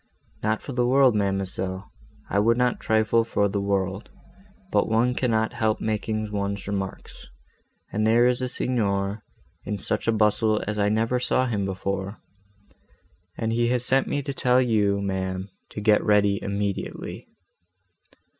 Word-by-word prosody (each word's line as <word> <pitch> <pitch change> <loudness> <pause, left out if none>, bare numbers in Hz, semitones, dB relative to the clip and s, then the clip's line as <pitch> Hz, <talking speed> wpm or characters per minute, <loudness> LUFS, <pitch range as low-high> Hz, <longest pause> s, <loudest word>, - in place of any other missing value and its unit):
"Not 110 +1 -1
for - - -6
the 125 -1 +1
world, 130 -1 +5
ma'amselle, 95 -2 -2 0.4
I 100 - +1
would 115 +3 +3
not 125 0 +1
trifle 110 +1 +2
for 105 -2 +1
the 100 0 -2
world; 100 0 -1 0.6
but - - +2
one 115 +3 +2
cannot 110 -3 0
help 110 -1 0
making 110 0 -2
one's 100 -1 -3
remarks, 95 -2 -5 0.7
and 110 +2 +1
there 115 +2 +5
is 125 0 +2
the 130 - -1
Signor 100 -5 -1 0.4
in 105 - -3
such 105 +3 -3
a - - +5
bustle, 110 0 +2
as 105 0 -3
I 100 0 +2
never 115 +4 +1
saw 130 +1 +1
him 105 -5 -1
before; 95 +1 -3 1.2
and 115 0 -1
he 120 +1 +2
has 125 0 +1
sent 135 +1 +3
me 145 - -1
to 140 0 -4
tell 125 -1 +3
you, 105 -5 +2
ma'am, 95 0 -3 0.2
to - - -7
get 105 0 +3
ready 105 -1 +3
immediately." 100 -1 -4
105 Hz, 155 wpm, -25 LUFS, 100-115 Hz, 1.2 s, world